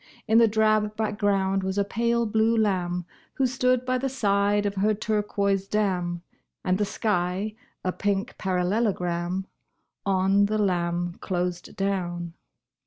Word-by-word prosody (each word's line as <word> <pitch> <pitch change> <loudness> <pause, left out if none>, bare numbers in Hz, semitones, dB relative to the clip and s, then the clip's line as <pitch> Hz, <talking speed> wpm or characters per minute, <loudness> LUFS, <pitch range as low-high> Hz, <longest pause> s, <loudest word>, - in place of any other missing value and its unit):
In 225 +1 +5
the 230 - +6
drab 215 0 +2
background 205 -3 +1
was 190 +1 -2
a 200 - +3
pale 235 +3 0
blue 220 +1 +2
lamb 180 -5 0 0.3
Who 270 - +2
stood 255 0 +1
by 255 0 +1
the 270 +1 -1
side 205 -4 +1
of 200 - 0
her 210 +2 +1
turquoise 200 -2 0
dam, 180 -5 -1 0.4
And 185 +1 +1
the 210 - +2
sky 195 0 -1 0.3
a 185 - 0
pink 200 +1 -1
parallelogram 185 -2 0 0.6
On 195 +1 +3
the 215 +1 0
lamb 175 -3 0
closed 180 -1 -3
down. 175 -3 -2
200 Hz, 135 wpm, -26 LUFS, 185-215 Hz, 0.6 s, the